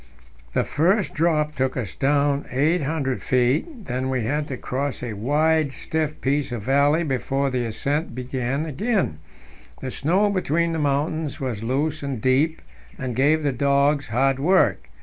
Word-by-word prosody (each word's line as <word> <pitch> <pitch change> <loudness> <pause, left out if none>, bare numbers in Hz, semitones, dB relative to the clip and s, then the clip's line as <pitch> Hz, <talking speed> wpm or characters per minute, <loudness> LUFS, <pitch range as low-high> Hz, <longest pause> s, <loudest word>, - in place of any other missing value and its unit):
The - - +2
first 185 +7 +1
drop 150 -1 +1
took 130 -2 -1
us 115 -6 -3
down 140 0 +1
800 145 -1 0
feet; 145 - 0
then 130 +1 -2
we 130 -3 0
had 145 +6 -1
to 130 - -4
cross 135 +2 -3
a 120 -3 -3
wide, 150 +7 +1
stiff 155 +2 -3
piece 140 0 0
of 120 -4 -4
valley 140 +6 +3
before 135 -1 -1
the 125 -2 -1
ascent 140 +6 -2
began 130 +3 -2
again. 165 - -1 0.6
The 130 - -5
snow 190 +11 +2
between 170 -3 +1
the 160 - -1
mountains 145 +1 -1
was 125 -6 -3
loose 145 +6 -1
and 140 -4 -3
deep, 140 +7 +1 0.3
and 125 -2 -4
gave 150 +5 +3
the 145 - +2
dogs 140 +2 +2
hard 135 +4 +1
work. 185 +7 +2
140 Hz, 155 wpm, -23 LUFS, 130-155 Hz, 0.6 s, valley